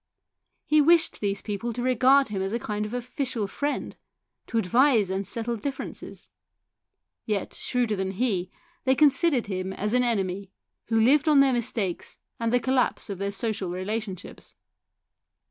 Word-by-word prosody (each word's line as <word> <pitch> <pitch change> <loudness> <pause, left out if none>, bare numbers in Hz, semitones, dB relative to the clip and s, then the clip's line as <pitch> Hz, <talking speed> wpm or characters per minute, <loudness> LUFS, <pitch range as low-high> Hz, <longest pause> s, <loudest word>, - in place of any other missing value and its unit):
He 305 0 +4
wished 325 +2 +4
these 200 -1 -2
people 225 +3 -3
to 240 +2 -4
regard 260 +1 +4
him 200 -2 -3
as 195 +2 -2
a 235 - 0
kind 210 -1 -3
of 215 - -9
official 245 -2 -3
friend, 285 +9 -3 0.5
to 230 - -2
advise 225 0 +3
and 190 0 -2
settle 230 +2 -3
differences; 270 +5 -7 0.9
yet, 210 -3 -2
shrewder 245 -4 -1
than 190 0 -2
he, 190 -5 -1 0.3
they 260 0 +3
con 295 +2 +6
sidered 280 -3 +1
him 190 -1 -3
as 210 +3 -3
an 250 - +4
enemy, 200 -5 -1 0.4
who 225 0 +1
lived 275 +7 +4
on 300 -2 +6
their 275 -1 +5
mistakes 220 -6 -2 0.2
and 230 -1 0
the 245 - +3
collapse 250 -3 0
of 190 - -6
their 200 0 -2
social 200 -2 -1
relationships. 190 +1 -5
225 Hz, 160 wpm, -26 LUFS, 200-255 Hz, 0.9 s, con